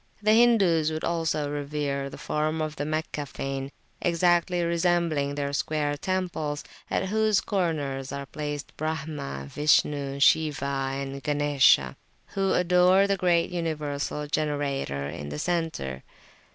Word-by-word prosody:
The 215 +1 +5
Hindus 195 -10 +4
would 155 0 -4
also 160 -3 0
revere 145 -1 -2
the - - -10
form 155 +1 -1
of 155 -1 -2
the 145 - -3
Meccan 155 -2 -3
fane, 135 0 -4 0.3
exactly 175 +1 +2
resembling 170 -4 +1
their 140 -1 -2
square 145 0 0
temples, 165 -3 -2 0.3
at 190 - -1
whose 215 -1 +3
corners 145 -9 -2
are 140 0 -5
placed 145 0 -6
Brahma, 150 - -4
Vishnu, 140 - +1
Shiwa 140 -3 +2
and 135 0 -6
Ganesha, 145 - +3 0.4
who 195 -1 +1
adore 180 +2 +4
the 200 0 +1
great 175 -2 +2
Universal 150 -3 -3
Generator 140 - -1
in 75 -1 -6
the 75 - -5
centre. 155 - -2
150 Hz, 125 wpm, -26 LUFS, 140-170 Hz, 0.4 s, The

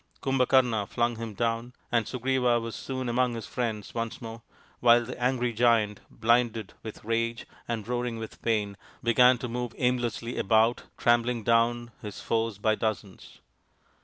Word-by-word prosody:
Kumbhakarna 125 -5 +2
flung 120 -1 0
him 115 -2 -6
down, 115 +2 -1 0.2
and 115 -3 +2
Sugriva 125 -1 +1
was 115 -1 -5
soon 130 -1 -4
among 120 0 +1
his 115 -3 -5
friends 110 -5 -3
once 115 -1 -3
more, 115 0 -8 0.4
while 120 0 +5
the 125 +1 -8
angry 125 -1 +1
Giant, 115 -3 +3
blinded 115 -2 +1
with 110 -1 -9
rage 115 +1 -1 0.2
and 115 -3 -3
roaring 120 -1 -2
with 110 -1 -8
pain, 105 -3 0 0.3
began 125 +2 +5
to 125 - -5
move 120 0 -4
aimlessly 120 -1 -1
about 110 +3 +3
trampling 120 0 +2
down 120 +1 +2
his 105 -2 -7
foes 115 -2 -1
by 110 +2 +2
dozens. 110 -3 -4
115 Hz, 150 wpm, -28 LUFS, 115-120 Hz, 0.4 s, while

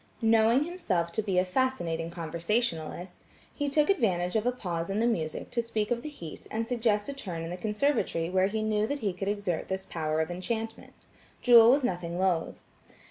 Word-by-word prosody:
Knowing 225 +4 +4
himself 220 - -1
to 220 - -1
be 195 -3 -1
a 180 - +4
fascinating 180 -7 -1
conversationalist, 170 +1 -2 0.4
he 290 -1 -1
took 295 +1 +3
advantage 185 - +1
of 220 +2 +1
a - - +4
pause 175 -8 -4
in 195 +2 -1
the 230 - +2
music 165 -10 -2
to 240 - +1
speak 220 -2 -2
of 235 0 0
the 305 - -6
heat 170 - -10
and 225 +1 -2
suggest 225 -4 +1
a 280 - -3
turn 180 -12 -5
in 165 - -5
the - - -3
conservatory 210 - 0
where 185 +1 +2
he 215 +2 -2
knew 215 0 +1
that 285 +2 -3
he 200 -4 0
could 195 +2 -5
exert 200 -5 -2
this 190 0 -3
power 155 -3 -2
of 160 +2 -1
enchantment. 225 +5 -5 0.4
Jewel 235 -2 +8
was 275 +2 +4
nothing 175 -5 -2
loth. 180 -3 0
205 Hz, 195 wpm, -29 LUFS, 175-235 Hz, 0.4 s, Jewel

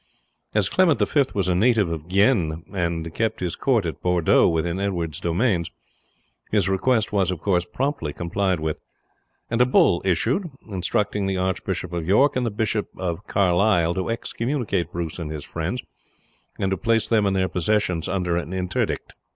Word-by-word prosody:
As 105 -3 +3
Clement 170 - +3
V 140 +7 +3
was 95 -3 +1
a 90 - +2
native 105 -1 +3
of 80 -1 -5
Guienne, 90 -5 +2
and 85 -3 -2
kept 115 +3 -1
his 90 -2 -2
court 120 -8 +1
at 80 -4 -4
Bordeaux 90 -2 +3
within 85 +2 -1
Edward's 85 -6 -2
dominions, 85 0 0 0.8
his 105 -3 +2
request 105 +3 +1
was, 95 -3 +2
of 90 -3 -2
course, 90 -1 +1
promptly 135 - -2
complied 90 +2 -1
with, 80 0 -2 0.7
and 115 +1 +2
a - - +7
bull 90 -8 +4
issued, 115 - +1 0.2
instructing 100 +1 -1
the 95 -1 -1
Archbishop 90 -1 -2
of 85 -2 -3
York 130 +9 +4
and 125 -2 0
the - - +1
Bishop 110 0 -1
of 90 +1 -4
Carlisle 90 -2 +3
to 95 +3 -3
excommunicate 115 - -2
Bruce 85 -1 -4
and 80 -3 -4
his 75 -2 -6
friends, - - -3 0.7
and 95 - -1
to 95 - 0
place 115 +1 +1
them 110 -3 +3
and 95 - +1
their 95 -1 +2
possessions 90 -2 0
under 90 -3 0
an 85 +1 -4
interdict. 90 -1 -2
95 Hz, 170 wpm, -23 LUFS, 85-110 Hz, 0.8 s, a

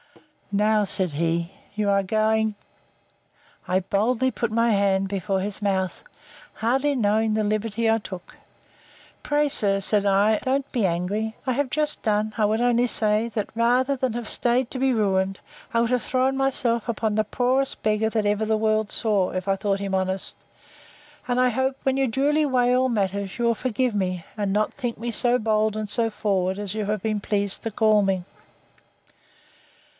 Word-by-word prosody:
Now, 210 +1 +2
said 190 -3 +2
he, 170 +3 -1 0.2
you 210 -1 -1
are 200 0 +3 1.7
going—I 185 - +3
boldly 225 +7 0
put 235 -3 -2
my 230 +1 +2
hand 195 -1 +2
before 195 0 -2
his 200 +2 -4
mouth, 190 -2 -1 0.5
hardly 270 +5 +1
knowing 215 -1 +1
the 215 - +1
liberty 215 +2 0
I 225 0 +3
took: 185 -4 -10 0.9
Pray, 295 0 +1
sir, 200 -7 +2
said 205 +1 +1
I, 205 +2 +3
don't 270 +1 -1
be 235 -6 +1
angry; 200 +6 -2
I 260 - 0
have 280 +1 -1
just 300 +2 -1
done—I 215 0 0
would 215 +2 +2
only 245 0 +2
say, 215 0 +1
that 210 -3 -2
rather 250 +4 +2
than 260 -3 -1
have 235 -1 -5
staid 245 +1 +1
to 260 - -4
be 265 0 +2
ruined, 195 -4 0 0.3
I 230 - +1
would 235 +1 +1
have 250 -2 +1
thrown 260 +1 +1
myself 250 -4 0
upon 220 -1 -1
the 215 - +2
poorest 255 +5 0
beggar 215 +1 +1
that 220 -2 -1
ever 205 +1 +1
the 220 0 +1
world 215 -1 +1
saw, 205 -5 +1
if 185 +1 -4
I 195 - +2
thought 195 0 -1
him 195 -1 -4
honest.—And 290 +8 -5
I 255 - +4
hope, 260 +2 -1
when 265 -1 +1
you 270 0 +1
duly 290 +6 +1
weigh 250 -2 +2
all 260 +1 +2
matters, 200 -3 -2
you 240 - -1
will 235 0 +2
forgive 250 0 -1
me, 185 -3 -2
and 205 -3 -2
not 210 +2 0
think 245 -4 -4
me 235 +1 -4
so 245 +1 +2
bold, 215 -1 0
and 215 -1 -3
so 225 +2 +1
forward, 195 -3 -1
as 205 -1 -4
you 215 -1 -2
have 210 -1 -2
been 215 -2 -1
pleased 200 -1 -1
to 225 - -3
call 215 0 +3
me. 190 -2 0
215 Hz, 180 wpm, -24 LUFS, 200-245 Hz, 1.7 s, I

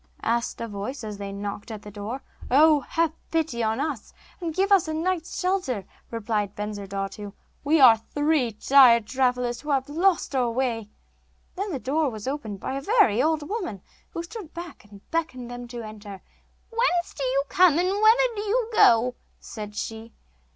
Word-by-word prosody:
asked 235 +1 -1
a 230 - -3
voice, 215 +5 -5
as 210 -2 -6
they 200 -1 -5
knocked 200 +2 -6
at 215 -2 -7
the 210 - -9
door. 210 +6 -6 0.3
'Oh! 300 +3 +6
have 325 +3 -1 0.2
pity 320 -8 -1
on 220 +1 0
us, 285 -7 -4 0.3
and 340 -3 -3
give 390 +2 +1
us 385 -5 +5
a 315 - -2
night's 345 +1 -2
shelter,' 360 - -1 0.2
replied 210 -3 -2
Bensurdatu; 200 -1 -5 0.3
'we 305 +3 +3
are 240 -5 +8
three 290 +1 0
tired 235 0 +6
travellers 250 -1 0
who 300 - -8
have 270 -1 +1
lost 335 0 +1
our 250 -2 +2
way.' 230 -3 -2 0.7
Then 395 +2 -3
the 290 - -2
door 285 +4 0
was 215 -1 -7
opened 245 -8 -4
by 265 - -4
a 275 - -3
very 285 - +3
old 310 -1 0
woman 360 - -4 0.3
who 335 - -5
stood 360 -2 -9
back, 345 0 -8
and 200 -1 -16
beckoned 255 -7 -3
them 245 0 -7
to 240 -1 -7
enter. 210 -2 -10 0.5
'Whence 455 -7 +1
do 280 - -4
you 265 +1 +1
come, 355 -2 +5
and 360 +2 +2
whither 445 +4 +4
do 415 - -3
you 450 +2 0
go?' 245 - +5 0.3
said 210 -2 -8
she. 225 +1 -6
260 Hz, 180 wpm, -25 LUFS, 220-330 Hz, 0.7 s, are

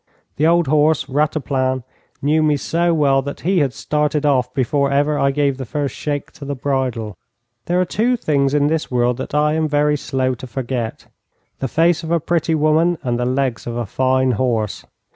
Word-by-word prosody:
The 155 - +3
old 170 0 +3
horse, 150 +1 +2
Rataplan, 135 -3 0 0.4
knew 155 +2 +3
me 150 -1 +2
so 170 +4 0
well 140 -4 +3
that 140 +1 -7
he 185 +2 +2
had 140 -4 +1
started 150 +4 -1
off 130 -4 +2
before 140 +1 0
ever 145 +2 +1
I 140 - +3
gave 140 -1 0
the 135 - -5
first 145 +3 -3
shake 145 -2 -4
to 150 - -12
the 140 0 -4
bridle. 125 -6 -2 0.5
There 175 +1 +1
are 185 - +2
two 235 +7 +1
things 140 -7 +1
in 145 -1 +3
this 155 +1 0
world 125 -1 +1
that 135 - -5
I 150 0 +2
am 160 0 +1
very 150 0 +2
slow 130 -2 -1
to 125 +1 -8
forget: 125 -2 -4 0.5
the 135 - -1
face 165 +5 +2
of 160 - -7
a 170 0 +2
pretty 165 0 0
woman, 160 +3 +2
and 120 -2 -1
the 125 - 0
legs 130 -2 -1
of 120 0 -4
a 120 - -2
fine 130 +4 +1
horse. 115 -3 -1
145 Hz, 200 wpm, -19 LUFS, 130-155 Hz, 0.5 s, The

